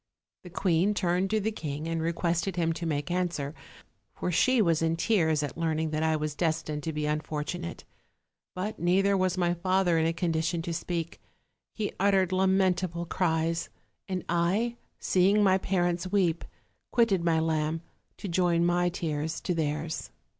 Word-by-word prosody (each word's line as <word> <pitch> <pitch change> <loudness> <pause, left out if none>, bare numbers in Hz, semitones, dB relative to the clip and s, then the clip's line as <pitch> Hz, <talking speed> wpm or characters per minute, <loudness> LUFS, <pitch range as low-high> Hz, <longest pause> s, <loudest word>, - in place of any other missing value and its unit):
The 180 - -11
queen 180 +3 +1
turned 185 0 +1
to 215 - +2
the 215 +2 -1
king 150 -5 -5
and 165 0 -1
requested 170 +2 -1
him 165 -2 +1
to 170 +1 -4
make 145 +1 -2
answer; 175 -5 -1 0.6
for 180 - -2
she 255 +9 +3
was 170 -7 +3
in 165 0 +1
tears 165 -5 +2
at 145 - -4
learning 160 -1 0
that 155 0 -1
I 160 0 +2
was 155 -1 -2
des 160 +1 +1
tined 150 -1 -4
to 160 - -3
be 150 -1 -2
unfortunate: 155 +3 -3 0.7
but 195 +4 -4
neither 195 +3 +3
was 185 -1 +1
my 175 -1 +2
father 180 -1 +2
in 160 - +2
a - - +2
condition 165 0 -1
to 170 -1 -3
speak: 170 0 -4 0.5
he 215 -2 -2
uttered 190 -2 +3
lamentable 185 -2 +1
cries, 165 -1 0 0.4
and 185 -2 -3
I, 190 +8 +1 0.2
seeing 195 +3 +3
my 190 -1 +4
parents 175 -1 0
weep, 180 -5 +1 0.4
quitted 220 -7 +2
my 165 -1 +3
lamb, 160 0 0 0.4
to - - -6
join 170 -1 +2
my 175 0 +2
tears 160 -3 -3
to 180 - -1
theirs. 155 0 -2
170 Hz, 165 wpm, -28 LUFS, 160-185 Hz, 0.7 s, my